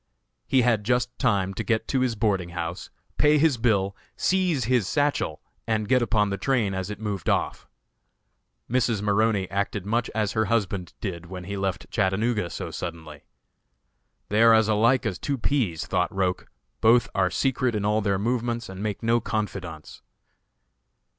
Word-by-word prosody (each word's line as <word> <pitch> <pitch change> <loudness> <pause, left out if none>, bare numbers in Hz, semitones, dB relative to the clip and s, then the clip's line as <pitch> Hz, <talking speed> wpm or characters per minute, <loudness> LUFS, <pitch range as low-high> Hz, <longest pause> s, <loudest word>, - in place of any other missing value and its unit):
He 130 -2 +3
had 115 -4 +2
just 125 +2 0
time 100 -5 +1
to 115 - -4
get 110 +2 0
to 135 - +1
his 125 -2 +1
boarding 100 -5 0
house, 85 0 -5 0.3
pay 150 +1 +5
his 150 -3 +3
bill, 100 -4 +1 0.2
seize 180 -8 +1
his 120 -3 +1
satchel, 145 - 0 0.2
and 110 -2 0
get 125 +2 +3
upon 105 -3 +1
the 100 - -3
train 115 -4 +1
as 95 0 -3
it 105 - -6
moved 105 -5 -3
off. - - -1 1.0
Mrs. 115 -4 +1
Maroney 105 -1 +2
acted 100 0 -2
much 115 +3 0
as 105 -2 0
her 110 0 +1
husband 100 -6 -1
did 85 -5 -5
when 90 0 -7
he 100 +2 -5
left 95 -2 -3
Chattanooga 105 0 0
so - - -6
suddenly. 80 -4 -7 1.0
"They 105 +2 +2
are 115 -1 +7
as 110 -1 +4
alike 115 +4 +3
as 90 - -2
two 140 -1 -2
peas," 110 - 0
thought 90 -1 0
Roch; 95 -2 -1 0.3
"both 115 +2 +5
are 95 -1 +2
secret 130 +3 0
in 105 -1 -1
all 105 +1 +2
their 100 -2 +1
movements, 120 +2 -1
and 95 0 -7
make 105 +1 -3
no 115 +1 +3
confidants." 95 -8 -5
105 Hz, 165 wpm, -25 LUFS, 95-120 Hz, 1.0 s, are